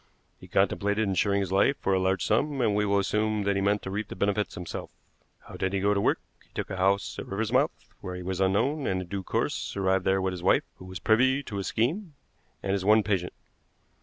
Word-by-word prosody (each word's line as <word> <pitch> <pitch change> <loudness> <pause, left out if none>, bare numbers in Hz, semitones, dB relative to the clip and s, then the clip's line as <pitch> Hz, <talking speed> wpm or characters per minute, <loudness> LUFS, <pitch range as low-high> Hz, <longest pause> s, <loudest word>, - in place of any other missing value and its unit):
He - - -13
contemplated 105 +1 +1
insuring 100 +1 +1
his 95 -2 -3
life 100 +8 +3
for 95 - 0
a 95 - +3
large 95 0 +1
sum, 140 +6 +1
and 115 -4 +2
we 105 0 +1
will 100 0 +2
assume 105 +1 0
that 100 0 +1
he 95 - +1
meant 100 +1 +1
to 95 - -5
reap 105 +2 -3
the - - -8
benefit 100 0 0
himself. 90 -1 -6 0.5
How - - -11
did 95 0 -1
he 100 - +1
go 100 +2 +2
to 100 - +1
work? - - +2 0.2
He - - -27
took - - -4
a 95 - -3
house 95 +2 +1
at - - -6
Riversmouth, 115 +9 +1 0.3
where 90 -2 -6
he 90 - -6
was 95 +1 -3
unknown, 120 +10 +1
and 95 -1 0
in - - -13
due 100 +1 -3
course 95 - -2
arrived 95 -1 +1
there 95 0 +3
with 95 0 0
his 90 - -6
wife, 95 - +3
who 95 - -11
was 95 0 -7
privy 130 +8 +3
to 100 - -6
his 100 - -3
scheme, 155 - -1 0.5
and 95 - -1
his 100 -1 0
one 105 +2 +5
patient." 95 -3 -1
100 Hz, 240 wpm, -27 LUFS, 95-110 Hz, 0.5 s, one